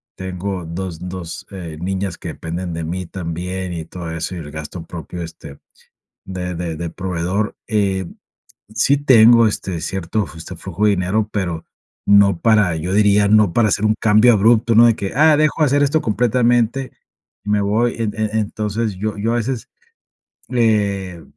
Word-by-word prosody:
tengo 95 -1 -5
2 85 0 -5
2 90 -2 -7
eh, 85 -5 -7
niñas 95 +1 -3
que - - -7
dependen 85 +1 -5
de 80 - -4
mí 90 +3 -4
también 90 +1 -5
y 80 -2 -5
todo 85 -1 -7
eso 80 +3 -4
y - - -6
el 75 -2 -8
gasto 80 +3 -7
propio, 85 +1 -7
este, 80 -4 -10 0.7
de 90 -1 -5
de 85 -1 -4
de 85 +1 -4
proveedor. 90 +3 -2
Eh, 100 -4 0 0.7
sí 135 +5 +3
tengo, 120 -4 +6
este, 95 -5 -3
cierto, 95 +4 -2
este, 75 - -11
justo, 85 +2 -9
flujo 95 +3 -3
de 105 - +5
dinero, 100 +3 0
pero 85 -5 -3 0.4
no 100 -3 +5
para 105 -6 +3
yo 85 +4 -3
diría, 105 0 +4
no 105 -3 +4
para 110 +3 +3
hacer 100 +2 0
un 110 0 +3
cambio 110 +2 +5
abrupto, 115 +2 +3
¿no? 120 +2 +7
De 115 - +3
que: 95 - -4
"Ah, 155 +1 +5
dejo 155 +1 +2
hacer 145 0 +3
esto 145 +2 +2
completamente 120 +2 +1 0.5
y 105 - -4
me 105 0 +2
voy". 110 +4 +1
En 110 -2 -2
e 110 -1 -1
entonces, 105 0 -2
yo 105 +3 -3
yo 115 +3 0
a 120 - +1
veces 120 0 -3 0.8
eh 100 -7 0
100 Hz, 175 wpm, -19 LUFS, 90-110 Hz, 0.8 s, no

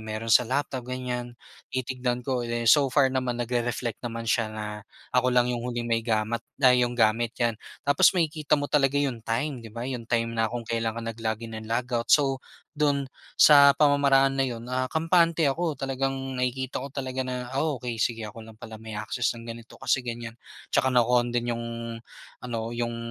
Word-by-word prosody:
meron 110 +1 -3
sa 125 - +5
laptop, 135 -1 -1
ganyan, 125 -1 -4 0.3
titignan 125 -1 -2
ko. 130 -2 -1
Eh, 120 0 -2
so 140 +4 +5
far 130 0 +3
naman, 130 -2 -1
nagre-reflect 120 -1 -2
naman 115 -1 -5
siya 110 -1 +1
na 110 0 -6 0.5
ako 125 0 +3
lang 125 0 +3
yung 120 - -2
huling 120 -1 -3
may 115 -1 +1
gamat 110 0 -1 0.2
ay 125 -1 +6
yung 120 - -7
gamit, 115 +1 +2
yan. 120 -2 +1 0.3
Tapos 145 0 +5
makikita 155 -3 +1
mo 145 - -2
talaga 145 -1 +2
yung 135 -5 0
time, 120 +4 -2
di 115 - -10
ba? 115 +2 -6
Yung 125 -3 -5
time 115 -1 0
na 115 -1 +1
kung 120 +1 -5
kailan 115 0 -2
ka - - -3
nag-log 115 0 -3
in 115 - -8
and 110 - -10
log 115 +2 0
out, 115 -1 -1
so 135 -3 +4 0.3
do'n 145 -3 +1 0.3
sa 140 -2 +8
pamamaraan 135 -2 +4
na - - +3
yun, 115 -1 -6
ah, 130 0 0
kampante 165 0 +2
ako. 155 +2 0
Talagang 135 0 -2 0.2
nakikita 130 +1 -2
ko 140 - -6
talaga 130 -1 -4
na, 125 0 -4
ah, 145 +2 0
okey, 120 -2 -5
sige, 115 -2 0
ako 105 +2 -8
lang 110 -1 -13
pala 110 0 -10
may 110 -1 -7
access 110 +3 -1
ng 115 - -10
ganito 115 0 -9
kasi 130 - +1
ganyan, 120 -2 -6 0.4
tsaka 130 - +3
naka-on 120 -1 +3
din 120 0 -1
yung 115 0 -4 0.8
ano, 115 -2 -4
yung 120 0 -2
120 Hz, 195 wpm, -26 LUFS, 115-135 Hz, 0.8 s, sa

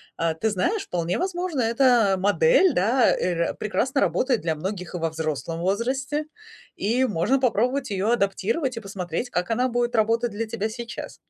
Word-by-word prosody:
А, 165 -1 0
ты 220 +8 -1
знаешь, 380 - 0
вполне 175 0 -2
возможно, 355 -6 -2
эта 230 -3 +3
модель, 370 - +4
да, 230 +7 +3
э, - - -3 0.3
р - - -5
прекрасно 260 +6 -1
работает 205 - +1
для 160 0 -1
многих 180 +2 -5
и - - -1
во 165 -1 -1
взрослом 160 +1 -3
возрасте, 265 - -1 0.5
и 235 +6 +1
можно 215 +4 +1
попробовать 255 +2 +1
её 200 +3 0
адаптировать 230 - 0
и - - -1
посмотреть, 195 +1 -4
как 180 -3 -2
она 250 +3 +2
будет 240 0 -1
работать 230 +2 +2
для 220 +2 -3
тебя 220 -1 -3
сейчас. 235 +1 -7
225 Hz, 170 wpm, -24 LUFS, 185-255 Hz, 0.5 s, модель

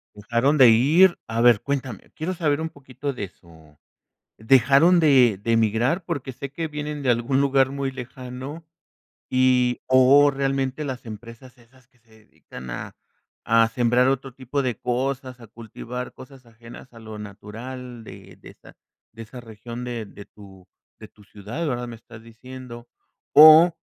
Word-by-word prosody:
¿Dejaron 120 +8 0
de 130 -4 +7
ir?, 155 +11 +4
a 115 +1 -2
ver, 120 -3 +5
cuéntame, 130 -6 -5
quiero 165 +4 -4
saber 155 -4 -1
un 160 - -3
poquito 140 -1 -7
de 110 -7 -6
su 80 -5 -21 0.6
¿dejaron 135 +9 +4
de 130 - +4
de 115 +2 0
migrar?, 115 - 0
porque 145 -6 -5
sé 135 +2 -8
que 165 +4 -4
vienen 150 -1 -6
de 130 - +2
algún 120 +3 0
lugar 135 -1 +2
muy 140 -1 -4
lejano 130 +4 -9 0.6
y, 125 -1 +2
o 130 +3 +5
realmente 135 +1 -2
las 130 -4 -7
empresas 115 +4 -12
esas 120 +1 -24
que 125 - -34
se 115 0 -37 0.2
dedican 65 0 -12
a - - -7 0.5
a 115 0 +3
sembrar 120 +2 +1
otro 135 0 -2
tipo 135 +2 -4
de 125 -5 -3
cosas, 130 0 -3
a 115 - -14
cultivar 120 +3 -8
cosas 130 -1 -15
ajenas 115 +2 -15
a 115 - -14
lo 110 -1 -10
natural 115 +4 -10
de - - -13
de - - -13
esa - - -19 0.4
de 115 0 -10
esa 120 +3 -11
región, 115 +1 -10
de 120 -2 -5
de 100 - -13
tu 95 -3 -17 0.3
de - - -11
tu 105 - -22
ciudad, 105 +11 -7
¿verdad?, 125 -3 -3
me 120 - -9
estás 110 0 -15
diciendo, 120 +1 -12 0.5
o, 155 +3 +8
125 Hz, 165 wpm, -23 LUFS, 115-135 Hz, 0.6 s, o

